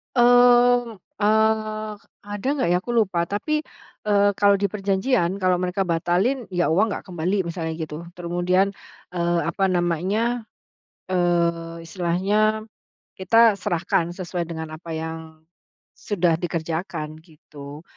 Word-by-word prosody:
Mmm, 245 -1 +5 0.2
ah, 215 0 +1 0.3
ada 205 +3 -5
nggak 270 - 0
ya 180 - +4
aku 240 - -5
lupa 190 -6 +2
tapi, 300 - -1 0.5
eee, 205 -1 +4
kalau 200 -1 +5
di 200 - +3
perjanjian 195 -1 +1
kalau 185 -1 +3
mereka 180 +2 -1
batalin 185 +9 0
ya 175 -1 +1
uang 200 +7 +3
nggak - - -6
kembali 175 +2 -1
misalnya 165 -1 -3
gitu 155 -2 -5 0.2
terus 175 -1 -7
kemudian, 180 +2 +2 0.5
eee, 175 -1 +1
apa 195 +3 -2
namanya, 195 +8 0 0.6
eee, 170 -2 0
istilahnya, 200 +6 0 0.5
kita 220 +2 +4
serahkan 170 0 -1
sesuai 175 -1 -4
dengan 160 -1 -6
apa 165 +1 -11
yang, 160 0 -4 0.8
sudah 175 -5 +1
dikerjakan 160 -2 -4
gitu. 150 -2 -12
185 Hz, 125 wpm, -23 LUFS, 170-215 Hz, 0.8 s, Mmm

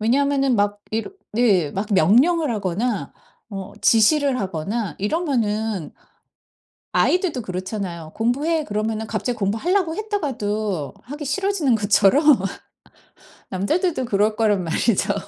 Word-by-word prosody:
왜냐하면은 275 +2 +2
막 205 0 0
이렇 225 - -3 0.2
네 200 -10 +3
막 195 +3 -3
명령을 265 - +4
하거나 200 - -2 0.4
어 195 0 -6
지시를 265 +4 +4
하거나 195 +3 -3
이러면은 220 - -1 1.0
아이들도 350 -9 +1
그렇잖아요. 185 -4 -5
"공부해." 295 +8 0
그러면은 215 0 -2
갑자기 220 +3 -2
공부하려고 320 - 0
했다가도 215 - -2
하기 295 +3 -7
싫어지는 320 - +1
것처럼 205 +7 +3 1.3
남자들도 280 - 0
그럴 215 0 +1
거란 210 -4 +1
말이죠. 185 +5 +1
220 Hz, 295 characters per minute, -22 LUFS, 200-285 Hz, 1.3 s, 명령을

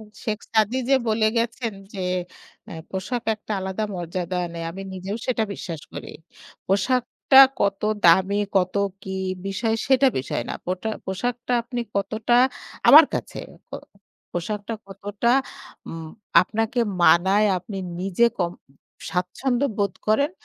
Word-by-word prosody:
এ - - -10 0.2
শেখ 215 -2 -1
সাদি 220 +3 +2
যে 270 - +6
বলে 215 0 +2
গেছেন 230 0 -1 0.2
যে 190 -2 -3 0.6
অ্যা - - -9 0.2
পোশাক 225 +6 -3
একটা 215 0 -7
আলাদা 190 +3 -2
মর্যাদা 175 +1 -3 0.2
নেই। 165 0 -5
আমি 195 +3 -7
নিজেও 190 +3 -5
সেটা 230 -3 +1
বিশ্বাস 165 -6 -6
করি। - - -8 0.5
পোশাকটা 250 +6 +4 0.2
কত 200 -1 +1 0.2
দামি, 190 +4 +5 0.2
কত 180 -1 +2 0.3
কী 190 -1 -5 0.3
বিষয় 220 +3 -1
সেটা 270 0 +5
বিষয় 130 -2 -2
না। - - -3
পোটা 185 +4 -3 0.2
পোশাকটা 240 +6 -3
আপনি 245 0 -4 0.2
কতটা 220 +4 0 0.5
আমার 310 +3 +11
কাছে। - - -4 0.3
ক - - -53 0.6
পোশাকটা 205 +5 -3
কতটা 205 +4 -2 0.6
উম 165 -1 -7 0.3
আপনাকে 225 +5 -1 0.2
মানায় 190 +6 +5
আপনি 195 +2 -8 0.2
নিজে 195 +5 +3
ক - - -3 0.7
স্বাচ্ছন্দ্য 240 +9 -1
বোধ 200 -2 +1
করেন 280 +8 +3
205 Hz, 130 wpm, -23 LUFS, 185-235 Hz, 0.7 s, আমার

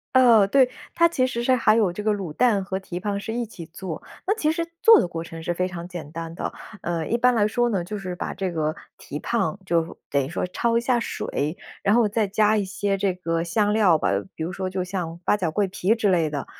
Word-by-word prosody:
呃， 235 -6 +7
对。 255 +4 +4 0.2
它 335 - +5
其 300 -7 +1
实 245 -2 -2
是 255 +1 +4
还 230 -2 +4
有 195 -6 +2
这 210 - -5
个 215 - +2
卤 190 -7 -4
蛋 220 -4 +3
和 190 0 -3
蹄 180 -2 -6
膀 200 +1 -2
是 220 +2 -5
一 240 0 -1
起 175 -6 -10
做， 170 0 -7 0.2
那 405 - +3
其 310 -8 +1
实 335 +1 -2
做 455 -2 +8
的 - - +1
过 165 -1 -5
程 165 -1 -9
是 175 +2 -1
非 180 +1 0
常 175 -1 -7
简 165 -5 -8
单 165 0 -6
的。 - - -4 0.3
呃， 170 -2 -2
一 235 - +1
般 250 +1 +4
来 210 -3 +3
说 240 +2 +1
呢， 195 -6 0
就 210 +4 -5
是 185 -2 -5
把 - - -4
这 190 -2 -3
个 155 -1 -1 0.2
蹄 145 - -7
膀 220 -1 -1
就 165 -1 0
等 140 -1 +1
于 135 - -5
说 170 - -2
焯 230 +5 0
一 - - +1
下 240 0 +2
水， 155 -6 -3 0.2
然 205 +3 +3
后 235 -3 +4
再 215 -1 +1
加 215 +2 +3
一 200 - 0
些 200 0 -1
这 195 -1 +1
个 165 -2 -2
香 205 +4 +1
料 195 -7 +5
吧， 95 - 0 0.3
比 160 - -4
如 175 - -3
说 185 0 -3
就 185 -1 -2
像 180 -3 -4
八 210 - +2
角、 175 -5 -1
桂 200 +4 0
皮 190 +4 +1
之 215 -3 +1
类 165 -3 +2
的。 145 -2 -4
195 Hz, 275 characters per minute, -24 LUFS, 170-225 Hz, 0.3 s, 做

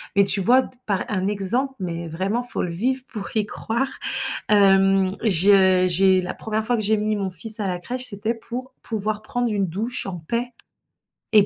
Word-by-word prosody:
mais 200 - +5
tu 195 +1 +4
vois? 250 +7 +4
D - - -10 0.2
par 200 -3 -1
un 190 -2 -1
exemple, 210 +7 -1
mais 170 -2 -5
vraiment, 190 +9 -2
faut 245 - -1
le 175 - -3
vivre 255 +9 +1
pour 210 -3 -7
y 215 - +1
croire. 235 +5 -3 0.6
Hem, 195 -2 +4
je 190 -1 +4
j'ai 185 +1 +3
la 180 - -4
1re 220 0 -3
fois 245 +1 +1
que 220 - -2
j'ai 215 +1 +2
mis 215 0 -1
mon 195 -2 -3
fils 210 +5 +6
à 205 - -1
la 180 -1 -3
crèche, 250 +7 -4
c'était 220 0 -2
pour 245 +3 -8
pouvoir 215 -1 -3
prendre 240 +1 -2
une 200 -2 0
douche 215 +9 -3
en 185 -2 -5
paix 235 +9 -3 0.8
et 210 -2 +6
205 Hz, 200 wpm, -22 LUFS, 190-230 Hz, 0.8 s, fils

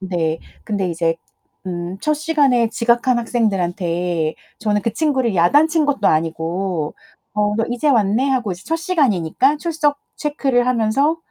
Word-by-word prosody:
네, 170 -4 -1 0.3
근데 200 -4 -1
이제 165 0 0 0.5
음 175 +1 -4
첫 305 0 +1
시간에 285 -7 +2
지각한 240 +2 +2
학생들한테 175 -7 -1 0.3
저는 210 -1 +1
그 230 - -1
친구를 265 -9 0
야단친 300 - +4
것도 270 -8 +1
아니고 165 +1 -1 0.4
"어, 210 0 +1
너 225 - +1
이제 245 +5 0
왔네." 230 +1 +2
하고 245 -7 0
이제 180 +2 -9
첫 325 - 0
시간이니까 275 - +1
출석 300 -3 0 0.2
체크를 275 -5 0
하면서 255 +6 +2
225 Hz, 295 characters per minute, -19 LUFS, 175-280 Hz, 0.5 s, 야단친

